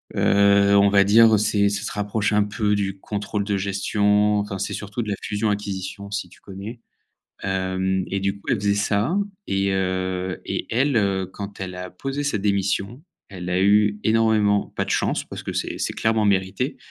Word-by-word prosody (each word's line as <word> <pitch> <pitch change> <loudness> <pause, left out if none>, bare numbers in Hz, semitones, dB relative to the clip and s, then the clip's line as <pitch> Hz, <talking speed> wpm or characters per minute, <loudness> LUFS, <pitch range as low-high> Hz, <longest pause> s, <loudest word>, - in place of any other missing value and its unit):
heu, 100 0 +4
on 100 0 +5
va 100 0 +5
dire 110 +2 +6
c'est 100 -1 +2
ça 100 0 -2
se - - -3
rapproche 105 +1 -1
un 105 0 +4
peu 105 0 0
du 95 -1 -2
contrôle 105 0 -3
de 100 -1 -1
gestion. 105 +1 +1
Enfin, 100 -1 -3
c'est - - -2
surtout 105 +3 -4
de 105 - -6
la 100 - 0
fusion 105 +1 -1
acquisition, 100 -1 -4
si 105 - -3
tu - - -19
connais, 105 +4 -9 0.6
hem 95 0 -1
et 100 - -2
du 100 +1 -2
coup, - - -22
elle - - +3
faisait 100 0 +1
ça 105 - +1 0.3
et 95 0 0
heu 95 0 -2
et - - -3
elle, 135 +1 +2
heu, 95 -2 0
quand 100 -1 -8
elle 95 -1 -5
a 90 0 -6
posé 135 +9 -4
sa 140 -7 0
démission, 100 +5 -1 0.3
elle 90 -2 -7
a 90 +1 +1
eu 105 +1 +3
énormément 110 -2 +2
pas - - -1
de - - -8
chance, - - 0
parce - - -8
que - - -5
c'est - - -3
c'est - - -2
clairement 110 -1 +1
mérité, 100 +7 0
100 Hz, 195 wpm, -23 LUFS, 95-105 Hz, 0.6 s, dire